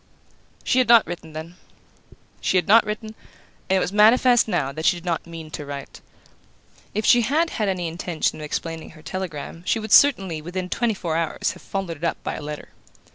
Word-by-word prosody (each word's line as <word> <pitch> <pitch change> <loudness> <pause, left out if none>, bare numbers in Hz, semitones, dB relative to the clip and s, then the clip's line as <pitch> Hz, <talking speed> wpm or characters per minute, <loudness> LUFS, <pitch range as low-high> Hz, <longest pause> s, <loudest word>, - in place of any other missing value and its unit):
She 255 - +2
had 255 - +3
not 235 -2 +7
written, 165 -2 -8
then; 160 +3 -8 0.8
she 185 - +1
had 180 - +1
not 220 +3 +7
written, 215 +1 -5 0.6
and 190 - +3
it - - +3
was 185 - -2
manifest 240 +3 +5
now 160 -10 0
that 155 +3 -6
she 175 - +3
did 170 - -12
not 170 -1 -2
mean 165 -2 -9
to 150 - -5
write. 140 -1 -8 0.9
If 215 0 -1
she 240 - +6
had 315 +8 +1
had 210 -3 -1
any 180 -3 -2
intention 165 -1 -2
of - - -7
explaining 165 +2 -4
her 155 - -16
telegram 165 -3 -6
she - - +2
would 220 -1 -6
certainly, 195 - +5
within 180 +3 -5
twenty 230 0 0
four 170 -4 -3
hours, 165 -1 -1
have - - -13
followed 190 -5 -4
it 155 - -16
up 170 - 0
by - - -3
a - - -6
letter. 150 0 -7
180 Hz, 205 wpm, -23 LUFS, 160-215 Hz, 0.9 s, not